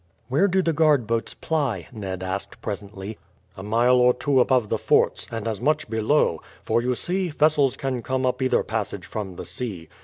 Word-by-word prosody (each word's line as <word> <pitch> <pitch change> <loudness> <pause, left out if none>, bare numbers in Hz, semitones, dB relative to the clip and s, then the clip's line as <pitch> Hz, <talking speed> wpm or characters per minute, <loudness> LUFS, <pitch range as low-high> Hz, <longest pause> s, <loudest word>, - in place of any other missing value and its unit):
"Where 150 +10 +3
do 190 0 +2
the 165 - +1
guard 150 -5 +3
boats 115 +1 -2
ply?" 135 - -1
Ned 95 -5 -5
asked 95 +1 -5
presently. 100 0 -6 0.4
"A - - -8
mile 120 +5 +3
or 125 0 +5
two 140 -2 +2
above 125 -3 +3
the - - -1
forts, - - +2
and 115 -1 -4
as 110 -3 -3
much 150 -6 0
below; 110 - +2 0.2
for, 115 - +1
you 125 +1 0
see, 180 +6 -2
vessels 150 -3 +2
can 130 -3 -2
come 130 +2 -1
up 125 +1 0
either 130 - +2
passage 100 -4 -3
from 100 -4 -5
the - - -7
sea. 95 -11 -6
125 Hz, 190 wpm, -24 LUFS, 105-140 Hz, 0.4 s, or